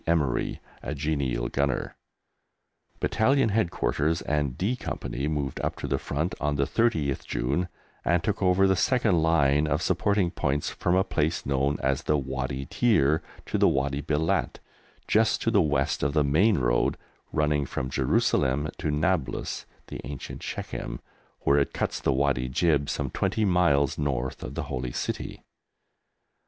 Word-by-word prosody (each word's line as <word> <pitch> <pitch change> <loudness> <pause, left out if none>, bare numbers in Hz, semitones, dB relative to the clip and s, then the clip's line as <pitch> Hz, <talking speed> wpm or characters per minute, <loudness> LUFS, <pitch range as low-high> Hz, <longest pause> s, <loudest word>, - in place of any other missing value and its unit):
Emery, 75 -7 +1 0.2
a 75 - -4
genial 70 -5 -1
gunner. 70 -1 -1 1.0
Battalion 130 +1 +2
Headquarters 85 -6 0
and 70 -4 -1
D 105 +7 0
Company 70 - -4
moved 70 -4 -2
up - - -2
to - - -5
the - - 0
front 80 +5 -2
on 75 0 0
the 70 - +2
30th 75 - +1
June 70 +9 -1 0.4
and 85 +1 +2
took 105 0 -1
over 95 +1 +4
the 95 0 +4
second 100 -1 +2
line 75 -2 +3
of - - 0
supporting 100 -4 +1
points, 70 -4 -1
from 90 - 0
a 95 - +4
place 80 -4 -1
known 70 +1 +1
as 65 0 +1
the 75 - +1
Wadi 65 0 -3
Tiyur 80 - +2 0.2
to - - -1
the - - +5
Wadi 70 +1 0
Belat, 75 +2 0 0.5
just 110 -1 +3
to 115 - +2
the 100 -3 +5
west 70 -4 0
of 70 +1 0
the 75 -2 +3
main 90 +9 +3
road - - +1 0.3
running 75 -2 +1
from 65 0 -3
Jerusalem 70 +2 +1
to - - -1
Nablus 75 -2 -1 0.2
(the - - -7
ancient 70 -3 -7
Shechem), - - -5 0.4
where 70 +1 +4
it 70 - 0
cuts - - -1
the - - +1
Wadi 65 -2 +1
Jib 70 0 +2
some - - -2
twenty 110 - 0
miles 80 -8 +2
north 65 -3 -2
of 65 - -6
the 80 - -2
Holy 65 -4 -4
City. - - -4
75 Hz, 155 wpm, -27 LUFS, 70-85 Hz, 1.0 s, the